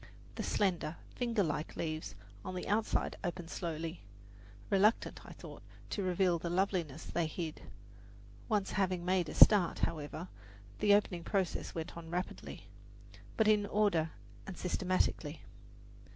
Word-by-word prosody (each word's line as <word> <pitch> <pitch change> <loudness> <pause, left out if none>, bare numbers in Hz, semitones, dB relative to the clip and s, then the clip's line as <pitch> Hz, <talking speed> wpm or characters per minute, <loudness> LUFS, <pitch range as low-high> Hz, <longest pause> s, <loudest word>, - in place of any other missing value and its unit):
The - - -4
slender, 175 -5 0 0.2
fingerlike 200 - 0
leaves 155 - -3 0.3
on 185 - -5
the 180 - -4
outside 210 +2 +1
opened 175 -2 -4
slowly, 165 -1 -4 0.7
reluctant, 205 +3 +3
I - - -9
thought, - - -10 0.3
to 205 - -1
reveal 180 -2 +2
the 170 - -3
loveliness 175 -5 0
they 170 -2 0
hid; 160 0 -5 0.9
once 205 -3 +1
having 185 -3 0
made 180 -3 +2
a - - -6
start, 200 -5 +7
however, 155 +2 -2 0.5
the 205 -1 +6
opening 180 -4 0
process 190 -1 -1
went 160 -1 -4
on 165 -1 -8
rapidly, 180 +2 -4 0.7
but 220 - +4
in 210 -1 +4
order 200 -7 +2 0.4
and 190 - -6
systematically. 180 -4 0
180 Hz, 130 wpm, -34 LUFS, 165-200 Hz, 0.9 s, start